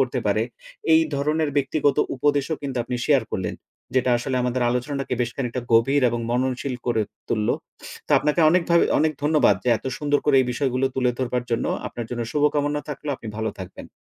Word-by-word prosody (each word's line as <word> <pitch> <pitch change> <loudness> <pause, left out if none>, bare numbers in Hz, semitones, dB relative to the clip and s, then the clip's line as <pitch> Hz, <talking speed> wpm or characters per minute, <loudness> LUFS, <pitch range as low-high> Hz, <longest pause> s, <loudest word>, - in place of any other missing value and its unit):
করতে - - +1
পারে, - - +2 0.5
এই 320 0 +6
ধরনের 150 +2 0
ব্যক্তিগত 145 0 +1 0.2
উপদেশও 145 +3 +1
কিন্তু 135 -2 -4
আপনি 125 0 -3
শেয়ার 140 -3 +4
করলেন। 90 -2 -2 0.4
যেটা 130 -1 +2
আসলে 130 +1 -2
আমাদের 125 0 0
আলোচনাটাকে 135 +2 -2
বেশ 120 -1 0
খানিকটা 125 -2 -2
গভীর 135 +5 +4
এবং 120 0 -2
মননশীল 130 +1 -1
করে 115 -2 +2 0.3
তুললো। 105 -2 +1 0.5
তো, - - -21
আপনাকে 150 +3 +1
অনেকভাবে 170 0 +3
অনেক 155 0 +2
ধন্যবাদ 150 - +4
যে, - - 0
এত - - -28
সুন্দর 145 -1 +1
করে 145 -2 +4
এই 130 - 0
বিষয়গুলো 130 0 0
তুলে 125 -1 +2
ধরবার 125 -1 -1
জন্য। 115 - 0 0.2
আপনার 120 -1 -6
জন্য 120 -1 -2
শুভকামনা 145 0 +1
থাকলো। 150 0 -6
আপনি 115 - -9
ভালো 110 0 -1
থাকবেন। 90 - -9
130 Hz, 180 wpm, -23 LUFS, 125-145 Hz, 0.5 s, এই